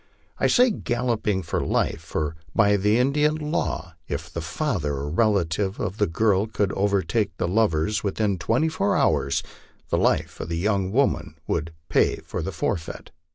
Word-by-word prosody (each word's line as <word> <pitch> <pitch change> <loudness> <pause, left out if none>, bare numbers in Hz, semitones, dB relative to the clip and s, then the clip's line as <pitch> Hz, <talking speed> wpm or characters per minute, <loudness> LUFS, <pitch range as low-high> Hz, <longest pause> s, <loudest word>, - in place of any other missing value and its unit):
I - - +3
say 250 -1 +5
galloping 115 - -1
for 85 - -2
life, - - 0
for 75 0 -3 0.2
by 105 -2 +5
the 105 +3 +2
Indian 150 +4 +2
law, 150 - -2
if 80 +4 -4
the 85 - -3
father 80 - -2
or 70 +2 -4
relatives 95 -1 +1
of 95 +3 -3
the 105 - +2
girl 100 +4 +2
could 100 -2 0
overtake 100 +1 0
the - - 0
lovers 105 -1 +1
within 100 -1 0
twen 115 - +1
ty 160 - +2
four 195 +4 +1
hours, 75 - +2 0.5
the - - +1
life - - +1
of - - -5
the 85 - -2
young 95 0 0
woman 90 - +1
would 80 0 -2 0.2
pay - - +3
the - - -5
forfeit. 80 -2 -3
100 Hz, 165 wpm, -24 LUFS, 85-115 Hz, 0.5 s, say